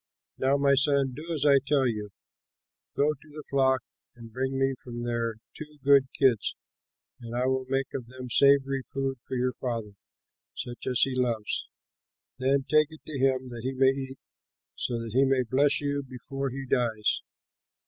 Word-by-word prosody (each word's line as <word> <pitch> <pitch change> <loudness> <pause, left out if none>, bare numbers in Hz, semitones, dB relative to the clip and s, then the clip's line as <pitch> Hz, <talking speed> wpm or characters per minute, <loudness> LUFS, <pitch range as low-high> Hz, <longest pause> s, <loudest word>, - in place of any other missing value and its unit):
Now, 135 +2 +3
my 140 0 +4
son, 140 -1 +2
do 160 +5 -7
as 150 -3 -1
I 140 -2 +7
tell 140 0 +1
you: 105 -4 -2 0.9
Go 150 +2 +3
to 155 - -18
the 150 0 -9
flock 130 -1 +3 0.3
and 115 -2 -12
bring 130 +2 -1
me 135 0 +2
from 120 -2 -6
there 115 -1 -1 0.2
two 150 -1 -9
good 140 -1 +6
kids, 130 -6 +3 0.6
and 115 0 -7
I 125 +1 +1
will 130 0 0
make 135 0 -1
of 125 -3 -5
them 130 +1 -8
savory 135 +1 +4
food 135 -1 -2
for 130 - -6
your 125 +1 0
father, 115 -5 -4 0.6
such 120 0 -6
as 125 -2 +2
he 135 - +3
loves. 120 -4 -1 0.7
Then 135 +1 +2
take 155 +2 +4
it 155 -1 -13
to 145 -3 -5
him, 130 -1 +1
that 120 -1 -7
he 130 +3 -2
may 130 0 +4
eat, 135 0 -6 0.6
so 120 -1 -2
that 115 -2 -7
he 130 +2 +5
may 135 -1 +3
bless 140 +5 +2
you 145 0 -1
before 135 +1 -5
he 135 +1 -6
dies." 115 -4 +1
130 Hz, 180 wpm, -28 LUFS, 125-140 Hz, 0.9 s, I